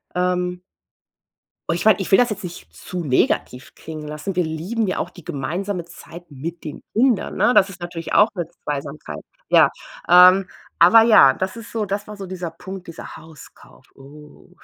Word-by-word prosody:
Ähm 180 0 -1 1.1
und 170 - +2
ich 175 - -3
meine, 215 -3 +5
ich 190 - -4
will - - +7
das 245 -2 +3
jetzt 200 -2 -6
nicht 175 -1 -9
zu 180 -1 -7
negativ 130 -1 -1
klingen 155 -1 -9
lassen. 150 +5 -6
Wir 180 - +2
lieben 180 +9 -3
ja 185 - -2
auch 175 - -3
die 175 -3 -15
gemeinsame 175 +6 -4
Zeit 170 0 -13
mit 160 +5 -7
den 150 - -8
Kindern, 240 -1 +1
ne? 245 - +3
Das 195 - +5
ist 185 -2 -12
natürlich 175 -1 -6
auch 210 +2 +6
'ne 175 -3 -3 0.2
Zweisamkeit. 145 +1 -6 0.3
Ja. - - +5 0.4
Ähm, 180 +1 +7 0.3
aber 220 +7 +7
ja, 215 - +7
das 190 +4 -4
ist 230 0 -11
so 220 -2 -2
das 200 +1 -4
war 210 0 -9
so 195 -1 -8
dieser 180 -2 -6
Punkt, 190 +2 -10
dieser 170 - -10
Hauskauf. 160 -2 -16
Oh! 150 +2 -16
180 Hz, 185 wpm, -21 LUFS, 160-195 Hz, 1.1 s, will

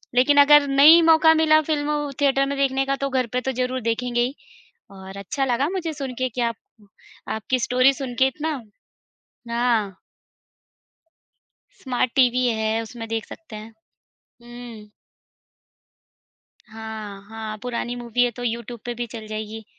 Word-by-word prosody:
लेकिन 285 +4 +4
अगर 290 0 +6
नहीं 295 +5 +7
मौका 320 0 +6
मिला 310 -1 +4
फ़िल्म 295 -1 -1
थिएटर 275 -1 +3
में 280 0 -3
देखने 270 -1 +1
का, 275 0 0
तो 275 0 -3
घर 255 -2 0
पे 250 - 0
तो 265 - -2
ज़रूर 255 0 -2
देखेंगे 240 +1 -1
ही। 255 +4 -1 0.6
और 190 0 -11
अच्छा 270 +8 -2
लगा 260 +5 0
मुझे 345 -4 -3
सुनके 255 -3 -4
कि 245 +2 -4
आप - - -16 0.8
आपकी 255 +4 -1
स्टोरी 255 +3 +3
सुनके 260 -1 0
इतना 295 0 -4 0.9
हाँ। 230 -5 0 1.8
स्मार्ट 250 -2 -1
टीवी 250 -1 +3
है, 220 0 0
उसमें 225 0 -8
देख 225 -1 -3
सकते 290 -10 -11
हैं। 220 +1 -10 0.7
हुँ। 240 -3 -11 1.8
हाँ, 220 -2 -8
हाँ, 220 -1 -6
पुरानी 245 0 -4
मूवी 240 0 0
है, 245 - +1
तो 245 +2 -9
यूट्यूब 235 0 -4
पे 240 - -3
भी 240 0 -4
चल 220 -1 -9
जाएगी। 215 0 -6
245 Hz, 145 wpm, -23 LUFS, 225-275 Hz, 1.8 s, नहीं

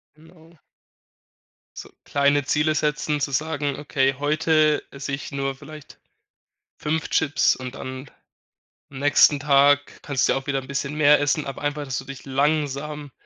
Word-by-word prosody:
Genau. 160 +1 -20 1.2
So - - -9
kleine 140 0 +2
Ziele 150 +2 +1
setzen, 150 0 -1
zu 140 - -2
sagen: 145 -1 -1
„Okay, 135 -2 0
heute 155 +1 +2
esse 140 0 -6
ich 140 +1 -5
nur 135 -1 -2
vielleicht 150 +1 -13 0.8
5 155 +1 -2
Chips,“ 145 - +2
und 130 0 -7
dann 130 +1 -7 0.8
am 135 - -10
nächsten 145 0 +5
Tag 145 0 +3
kannst 140 -3 0
du - - +3
ja - - 0
auch 135 - -11
wieder 135 -1 -1
'n - - -12
bisschen 140 +1 -3
mehr 150 -1 +5
essen, 145 +1 0
aber 135 - -7
einfach, 145 0 -2
dass 130 -2 -3
du - - -8
dich 135 -1 -9
langsam 145 0 -1
145 Hz, 160 wpm, -23 LUFS, 140-150 Hz, 1.2 s, nächsten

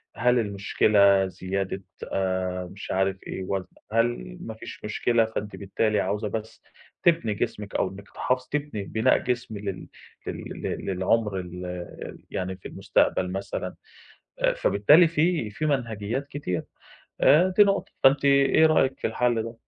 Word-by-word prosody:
هل 125 +1 +3
المشكلة 100 -1 +3
زيادة 95 +1 -4 0.3
آآ، 95 -1 -1
مش 100 - -7
عارف 95 0 +1
إيه 95 - -4
وزن؟ 95 0 -3 0.2
هل 115 - 0
ما 110 - -6
فيش 110 - -10
مشكلة 115 +2 +2
فأنتِ 105 -2 -5
بالتالي 105 +1 0
عاوزة 105 +3 -1
بس 110 +1 -6 0.4
تِبني 165 -11 +3
جسمِك 105 -2 -4
أو - - +1
إنِّك 95 +1 -11
تحافظ 125 0 -1
تِبني 145 -8 -2
بِناء 110 +5 +2
جسم 120 -3 -3
لل 100 -2 -5 0.4
لل - - -6
لل - - -4
للعمر 95 +2 +1
ال 90 0 -7
يعني 95 0 -3
في - - -10
المستقبل 90 0 +1
مثلًا؟ 95 +1 -4 0.8
فبالتالي 145 - +5
في 160 -7 +1
في 155 +9 -3
مَنهَجيّات 120 -1 -2
كتير 115 - -3 0.6
آآ، 170 +6 +6
دي 210 - +9
نقطة، 200 0 0
فأنتَ 135 +1 +5
إيه 140 +3 +5
رأيَك 135 -4 +2
في - - 0
الحَل 115 0 +1
ده؟ 115 +1 -7
105 Hz, 145 wpm, -26 LUFS, 95-125 Hz, 0.8 s, دي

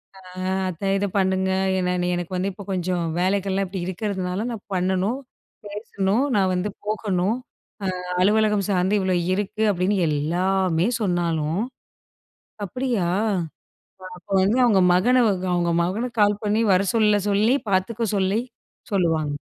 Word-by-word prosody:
ஆ, - - -14 0.5
அத்த 180 +1 -8
இத 205 - 0
பண்ணுங்க. 190 0 +1 0.3
என்ன 180 -1 0
எனக்கு 175 +1 -4
வந்து, 190 +2 -1
இப்போ 200 - -10
கொஞ்சம் 180 -1 -1 0.2
வேலைகள்லாம் 195 +1 0
இப்பிடி 185 -1 -5
இருக்கிறதுனால, 190 +1 -3
நான் 225 -4 -7
பண்ணணும், 190 +6 0 0.5
பேசணும், 205 +2 -1
நான் 190 -2 +2
வந்து 180 +3 -1 0.2
போகணும். 210 -1 0 0.7
அ - - -9 0.2
அலுவலகம் 210 0 +3
சார்ந்து 190 +2 +2
இவ்ளோ 185 -1 +1 0.2
இருக்கு. 205 +2 -2
அப்பிடின்னு 190 +1 +1
எல்லாமே 175 +4 +1
சொன்னாலும், 170 -3 0 1.1
அப்பிடியா! 235 -2 -1 1.1
அப்ப 180 +2 -19
வந்து, 210 +6 +2
அவுங்க 205 -6 +4
மகன, 245 +7 +4 0.3
அவுங்க 175 -1 +1
மகனுக்கு 220 +6 -2
கால் 205 0 +2
பண்ணி 210 +2 +2
வர 185 - +4
சொல்ல 210 -2 +3
சொல்லி, 210 +5 +3 0.2
பார்த்துக்க 215 +3 0
சொல்லி 195 +3 +1 0.5
சொல்லுவாங்க. 165 -6 +1
190 Hz, 125 wpm, -23 LUFS, 180-210 Hz, 1.1 s, அவுங்க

